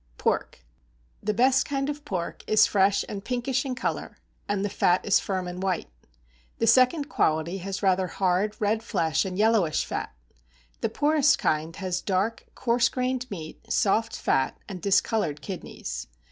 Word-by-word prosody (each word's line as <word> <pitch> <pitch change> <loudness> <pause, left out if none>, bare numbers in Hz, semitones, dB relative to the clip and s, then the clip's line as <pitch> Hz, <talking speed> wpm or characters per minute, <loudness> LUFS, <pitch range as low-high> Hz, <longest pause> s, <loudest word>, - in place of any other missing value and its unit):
=Pork.= - - -1 0.6
The 210 - 0
best 260 +4 +4
kind 275 -1 -1
of 295 0 -4
pork 180 -9 -4
is 215 - +6
fresh 200 0 +2
and 200 -1 -6
pinkish 255 +2 -1
in 260 -2 -2
color, 255 - -3 0.3
and 205 -1 0
the - - +1
fat 180 -2 +2
is 205 - +4
firm 185 -2 -3
and 180 +1 -6
white. 185 - -2 0.7
The - - +1
second 255 +6 +4
quality 160 - 0
has 190 +1 -5
rather 190 -1 +3
hard, 190 +3 0
red 215 +1 +1
flesh, 180 -7 0
and 185 -1 -4
yellowish 210 -7 +2
fat. - - -4 0.7
The - - 0
poorest 295 0 +3
kind 155 +1 -1
has 185 -2 -2
dark, 200 +4 -1
coarse 240 0 +2
grained 255 0 -2
meat, 160 -6 -8
soft 220 +2 +2
fat, 135 0 0
and 185 -4 -7
discoloured 200 -5 +1
kidneys. 65 - -6
200 Hz, 160 wpm, -26 LUFS, 180-245 Hz, 0.7 s, is